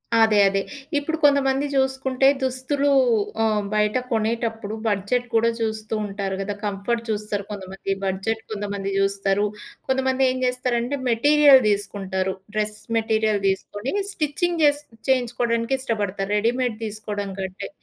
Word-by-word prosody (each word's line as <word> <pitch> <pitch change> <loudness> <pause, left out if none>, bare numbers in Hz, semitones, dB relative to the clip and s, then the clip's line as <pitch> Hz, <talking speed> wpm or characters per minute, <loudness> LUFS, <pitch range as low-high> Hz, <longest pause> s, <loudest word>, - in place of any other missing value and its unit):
అదే 220 -2 +5
అదే. 195 0 0 0.4
ఇప్పుడు 315 +3 -1
కొంతమంది 280 -1 +4
జుసుకుంటే, 265 0 +2 0.2
దుస్తులు 260 +2 0 0.5
ఆహ్, 215 -2 +1
బయట 210 +1 +2 0.2
కొనేటప్పుడు 225 -1 -1
బడ్జెట్ 215 +4 0
కూడా 230 +1 +4
చూస్తూ 220 -1 -2
ఉంటారు 195 -1 -3
గదా! 200 +1 -3
కంఫర్ట్ 205 +4 -2
చూస్తారు 210 -1 -2
కొంతమంది, 195 -1 -5
బడ్జెట్ 195 +4 -1
కొంతమంది 200 -2 -3
జూస్తారు. 195 +1 +1 0.4
కొంతమంది 265 0 +1
ఏం 255 - -1
చేస్తారంటే 250 +1 0
మెటీరియల్ 285 +3 +6
దిసుకుంటారు. 190 -2 -1 0.2
డ్రెస్ 210 0 -1 0.2
మెటీరియల్ 220 -2 +1
దీసుకొని 205 +5 -2 0.2
స్టిచ్చింగ్ 335 +1 -1
చేసి 290 0 +4 0.3
చేయించుకోవడానికిష్టపడతారు. 235 -5 0
రెడీమేడ్ 235 +1 0
తీసుకోవడం 210 -1 -4
కంటే. 190 0 -5
225 Hz, 115 wpm, -23 LUFS, 205-260 Hz, 0.5 s, మెటీరియల్